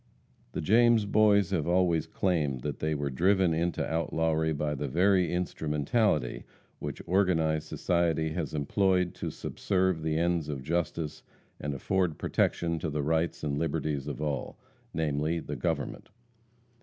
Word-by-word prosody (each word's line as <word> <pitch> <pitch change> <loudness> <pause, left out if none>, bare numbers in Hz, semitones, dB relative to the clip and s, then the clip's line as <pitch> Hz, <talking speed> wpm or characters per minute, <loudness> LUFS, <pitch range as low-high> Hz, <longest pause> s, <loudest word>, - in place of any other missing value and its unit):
The - - -2
James 115 +4 +4
Boys 100 -2 +4
have 85 -5 0
always 85 -2 +2
claimed 75 -9 0
that 75 0 -4
they 80 0 0
were 70 -1 -2
driven 95 +4 +3
into 85 +1 0
outlawry 80 0 0
by 75 0 -1
the 75 0 -3
very 90 +5 +3
instrumentality 80 - 0 0.4
which - - -5
organized 80 -4 +1
society 80 -2 0
has 80 -2 -3
employed 90 +4 +1
to - - -4
subserve 95 -4 -1
the 80 0 0
ends 85 -2 0
of 70 -3 -4
justice 80 0 -2 0.4
and 75 -1 -3
afford 90 +3 0
protection 85 -1 0
to 80 - -2
the 75 -1 -2
rights 80 +2 0
and 70 -1 -1
liberties 75 -3 -2
of 75 - -4
all 70 -3 -3 0.3
namely, 80 +1 0
the - - -5
government. 80 -5 -3
80 Hz, 145 wpm, -29 LUFS, 75-90 Hz, 0.4 s, James